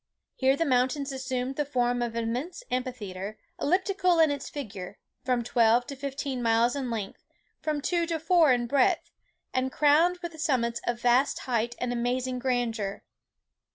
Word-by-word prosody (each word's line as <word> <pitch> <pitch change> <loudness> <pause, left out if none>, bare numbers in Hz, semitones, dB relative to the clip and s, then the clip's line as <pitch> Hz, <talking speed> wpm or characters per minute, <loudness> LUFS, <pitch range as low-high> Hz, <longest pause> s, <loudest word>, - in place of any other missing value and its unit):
Here 265 +1 +2
the 330 - +1
mountains 265 +1 +1
assumed 260 0 -3
the 295 - +2
form 245 -3 0
of 235 -1 -2
an 230 - -1
immense 270 - -3
amphitheatre, 215 -6 -4 0.2
elliptical 365 +2 +2
in 320 -2 +5
its 285 - -4
figure, 205 -9 -7 0.3
from 250 -2 +1
twelve 235 0 +3
to 280 - -7
fifteen 275 -1 -4
miles 230 +2 +3
in 270 -3 -3
length, 215 -4 -5 0.4
from 305 -2 -1
two 340 +2 0
to 330 -1 -1
four 330 -2 +4
in 245 -1 +2
breadth, 265 +2 +2 0.4
and 260 0 0
crowned 310 +6 +4
with 330 -3 -6
summits 235 -6 0
of 240 0 -1
vast 245 +3 +3
height 240 -1 -1
and 245 0 -2
amazing 250 +1 -1
grandeur. 230 -6 -1
255 Hz, 160 wpm, -28 LUFS, 240-285 Hz, 0.4 s, in